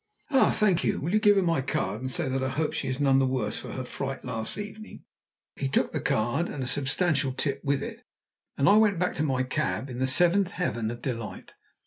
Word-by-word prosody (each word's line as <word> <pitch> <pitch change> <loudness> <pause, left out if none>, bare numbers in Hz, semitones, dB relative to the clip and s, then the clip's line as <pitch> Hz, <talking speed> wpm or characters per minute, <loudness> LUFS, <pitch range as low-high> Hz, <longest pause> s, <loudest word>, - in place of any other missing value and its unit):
"Ah! 270 -2 +5
Thank 195 -5 +2
you. - - +1
Will 165 +7 -3
you 215 - +5
give 205 -1 +5
her 195 - +3
my 165 -5 +1
card, 130 - -2
and 130 0 -3
say 165 +1 -1
that 130 0 -1
I 130 - 0
hope 150 +4 -1
she - - -2
is 130 0 -2
none 135 -2 +4
the 135 - +3
worse 130 -5 -1
for - - -8
her 130 - -4
fright 135 +1 -5
last 115 -3 -3
evening?" 210 +1 -8 0.5
He - - -2
took - - +1
the - - -3
card, 120 +10 0
and 135 - -4
a - - -4
substantial 140 +1 +1
tip 140 +1 -2
with 140 -1 0
it, - - -7 0.6
and 140 - +2
I 205 - +7
went 210 -4 +4
back 180 +1 0
to 155 - +1
my 130 -4 +1
cab 135 0 -2
in 125 - -6
the 130 - +1
seventh 175 +8 +3
heaven 120 -11 -2
of 120 +1 -7
delight. 115 -5 -5
135 Hz, 240 wpm, -27 LUFS, 130-175 Hz, 0.6 s, I